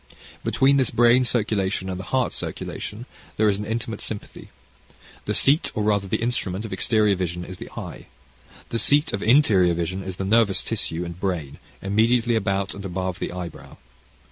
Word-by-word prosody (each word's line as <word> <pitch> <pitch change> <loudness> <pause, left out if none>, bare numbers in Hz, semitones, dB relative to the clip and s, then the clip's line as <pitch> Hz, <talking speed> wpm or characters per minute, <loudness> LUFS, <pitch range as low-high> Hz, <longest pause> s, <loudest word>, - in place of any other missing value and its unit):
Between 140 +1 +3
this 130 -3 +2
brain 120 +2 +4
circulation 105 -5 0
and 95 -1 -4
the 95 - -7
heart 130 +2 0
circulation 110 +4 -6 0.3
there 110 - +3
is 100 -1 +2
an 105 - -4
intimate 110 -1 -3
sympathy. 105 -2 -6 0.8
The - - -1
seat, 145 +4 +4
or 105 - 0
rather 100 -2 +1
the 95 - -1
instrument 110 -4 -2
of 110 - -6
exterior 110 -3 +2
vision, 90 -1 -3
is 90 0 -9
the - - -8
eye. - - -7 0.6
The 115 - -1
seat 145 +5 +3
of 100 - -2
interior 105 - +4
vision 85 +3 -2
is 95 -1 -6
the 95 - -4
nervous 105 -1 +3
tissue 85 +2 -2
and 85 0 -8
brain, 85 -7 -3 0.2
immediately 115 +4 +2
about 100 -3 0
and 100 - -8
above 95 -1 -3
the - - -3
eyebrow. 90 -2 -8
100 Hz, 175 wpm, -23 LUFS, 95-115 Hz, 0.8 s, brain